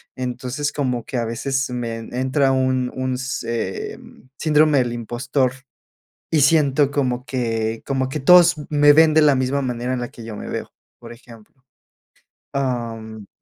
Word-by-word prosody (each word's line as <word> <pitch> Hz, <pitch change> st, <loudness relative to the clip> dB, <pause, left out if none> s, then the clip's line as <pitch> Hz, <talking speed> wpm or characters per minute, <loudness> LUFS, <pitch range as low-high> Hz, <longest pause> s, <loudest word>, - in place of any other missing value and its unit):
Entonces, 130 Hz, +3 st, -3 dB
como 125 Hz, -5 st, -2 dB
que 130 Hz, -, -4 dB
a 120 Hz, -, -1 dB
veces 130 Hz, +4 st, -2 dB
me 120 Hz, -2 st, -3 dB
entra 130 Hz, +4 st, 0 dB
un 130 Hz, -1 st, 0 dB
un 130 Hz, -1 st, -2 dB
se 115 Hz, -6 st, -4 dB
em, 130 Hz, -, -16 dB
síndrome 155 Hz, -1 st, +3 dB
del 120 Hz, -2 st, 0 dB
impostor 125 Hz, +3 st, -1 dB, 0.8 s
y 155 Hz, -, +3 dB
siento 145 Hz, -1 st, +3 dB
como 130 Hz, -3 st, -1 dB
que 115 Hz, -4 st, -2 dB
como 130 Hz, -1 st, -1 dB
que 150 Hz, -, -4 dB
todos 175 Hz, +3 st, +7 dB
me 145 Hz, -1 st, +5 dB
ven 160 Hz, +1 st, +5 dB
de 155 Hz, -, +5 dB
la 145 Hz, -3 st, +5 dB
misma 130 Hz, +2 st, 0 dB
manera 125 Hz, -1 st, -3 dB
en 125 Hz, -, -2 dB
la 120 Hz, -, -4 dB
que 115 Hz, -, -12 dB
yo 110 Hz, -2 st, -7 dB
me -, -, -7 dB
veo, -, -, -5 dB, 0.3 s
por -, -, -11 dB
ejemplo. 115 Hz, -2 st, -15 dB, 1.0 s
Am. 115 Hz, -5 st, -4 dB
130 Hz, 160 wpm, -21 LUFS, 120-140 Hz, 1.0 s, todos